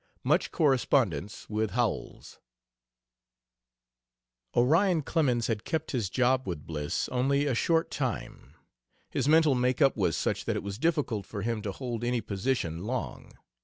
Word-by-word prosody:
MUCH - - +2
CORRESPONDENCE 120 - +1
WITH 110 0 -1
HOWELLS 120 -2 -2 2.2
Orion 160 +7 +4
Clemens 130 -8 +1
had 110 -2 -2
kept 160 -1 -2
his 115 -8 -1
job 130 +3 +1
with 85 -5 -4
Bliss 75 -2 -2
only 140 +3 +1
a 140 - +1
short 165 +7 +1
time. 130 -5 -4 0.6
His - - -1
mental 155 -1 +5
make 125 0 +1
up 140 -3 +4
was 90 -7 +1
such - - -1
that - - -1
it - - -3
was 100 +1 -5
difficult 140 - 0
for 100 -3 -5
him 115 -1 -1
to 100 - -3
hold 120 +1 -5
any 120 0 +1
position 100 -6 -2
long. 110 - -4
125 Hz, 145 wpm, -29 LUFS, 105-140 Hz, 2.2 s, mental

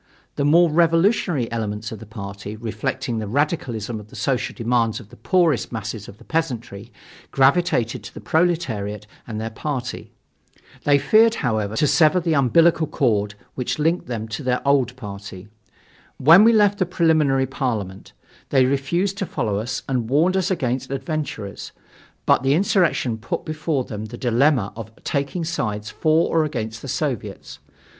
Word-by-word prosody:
The 140 - -1
more 170 +4 +5
revolutionary 165 - +2
elements 110 -2 -3
of 110 - -7
the 115 - -11
party, 100 -1 -7
reflecting 115 +2 -3
the 110 - -4
radicalism 120 - -1
of 105 - -12
the - - -15
social 135 -3 -1
demands 115 0 0
of 110 -4 -14
the - - -14
poorest 160 - +1
masses 110 -2 -5
of 100 - -12
the 120 - -16
peasantry, 120 -8 -3 0.4
gravitated 135 -4 +2
to - - -9
the - - -7
proletariat 120 - -1 0.2
and 110 -2 -5
their 110 +1 -4
party. 125 0 -5 0.7
They 145 -1 +5
feared, 225 +9 +4
however, 110 -3 -1
to 150 - +2
sever 155 +4 +4
the 165 -2 0
umbilical 160 +4 +4
cord 105 -7 0 0.2
which 125 - -3
linked 165 +4 0
them 115 -3 -4
to 105 - -4
their 125 +1 -1
old 130 -3 +2
party. 100 -4 -9 0.7
When 165 +9 +7
we 230 - +7
left 205 -2 +3
the 185 - +1
Preliminary 155 -6 +2
Parliament, 110 -8 -4 0.4
they 130 -2 +4
refused 170 +9 0
to 195 - -2
follow 110 -7 -1
us 115 +3 -4
and 125 -4 -1
warned 165 +7 +3
us 190 -1 +1
against 130 -7 -1
"adventurers," 135 -7 -5 0.5
but - - +4
the 135 +2 +2
insurrection 170 - +1
put 115 - -4
before 155 -3 -1
them 110 -3 -6
the 120 +2 -8
dilemma 120 -2 +2
of 110 -1 -7
taking 140 +5 -2
sides 105 -9 -3
for 160 +1 +1
or 160 - +4
against 110 -7 -4
the - - -8
Soviets. - - -4
130 Hz, 160 wpm, -22 LUFS, 110-160 Hz, 0.7 s, When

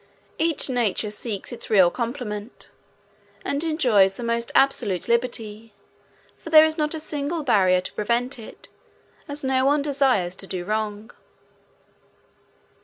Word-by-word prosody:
Each 325 -1 +2
nature 230 -4 -1
seeks 210 0 -5
its 240 - -5
real 190 -5 +5
complement, 235 -2 -6 0.7
and 280 +2 -1
enjoys 240 - +3
the 240 - -7
most 235 0 -2
absolute 205 -9 +2
liberty, 230 -3 -2 0.6
for - - -9
there 310 -1 +8
is 315 0 -1
not 300 0 -1
a - - -4
single 305 +1 -3
barrier 185 -8 +3
to 185 - -8
prevent 240 +4 -1
it, 220 - -11 0.6
as 285 0 -4
no 265 -1 +1
one 285 +1 +2
desires 265 -11 +1
to 195 - -8
do 180 -2 -4
wrong. 215 +1 -3
235 Hz, 135 wpm, -23 LUFS, 210-280 Hz, 0.7 s, there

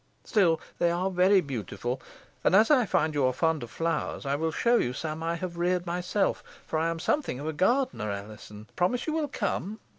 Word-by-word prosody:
Still, 175 -7 +3 0.2
they 175 - +3
are 180 +3 0
very 185 +2 +5
beautiful; 120 - -4 0.4
and, - - +4
as 220 +7 +6
I 255 -7 +5
find 155 -2 +1
you 145 -2 +1
are 130 - +2
fond 160 +2 +1
of 120 - -7
flowers, 165 -2 -2
I 140 - 0
will 160 +2 0
show 235 +8 +3
you 125 - 0
some 155 +3 -4
I 165 +1 -1
have 170 0 -5
reared 180 0 +1
myself, 180 +3 -1 0.2
for 155 - -1
I 165 +1 +1
am 165 - -2
something 165 - -1
of 145 - -6
a 160 - -2
gardener, 190 - +1
Alizon. 105 +1 -8
Promise 215 +8 +1
you 310 - -1
will 315 -2 0
come." 220 -5 -3
170 Hz, 210 wpm, -28 LUFS, 145-190 Hz, 0.4 s, as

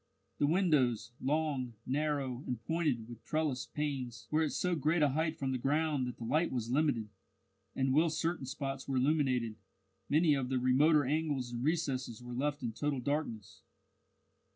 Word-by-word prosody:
The 145 - +3
windows, 140 - +2
long, 140 -4 0
narrow, 140 -2 -1
and 125 -3 -2
pointed, 155 -9 0
with 120 -1 -11
trellised 155 -5 -1
panes, 130 -6 -3
were 155 +1 +3
at 155 - +1
so 180 -1 0
great 155 +1 +2
a 145 - +5
height 160 +3 0
from 135 -1 -1
the 130 - -1
ground 145 0 +1
that 125 - -6
the - - -7
light 150 +9 +1
was 120 -2 -2
limited, 130 -6 +1 0.7
and 130 0 +1
whilst 160 +2 +3
certain 165 -5 -1
spots 135 0 -4
were 135 -1 0
illuminated, 130 -5 +1 0.5
many 155 +1 +4
of 135 -3 -1
the 130 - +1
remoter 140 +4 +4
angles 145 -3 -1
and 120 0 -4
recesses 135 -7 -1
were 125 0 -8
left 145 +2 -1
in 115 -2 -2
total 140 +3 -1
darkness. 125 -6 -3
135 Hz, 170 wpm, -33 LUFS, 125-155 Hz, 0.7 s, a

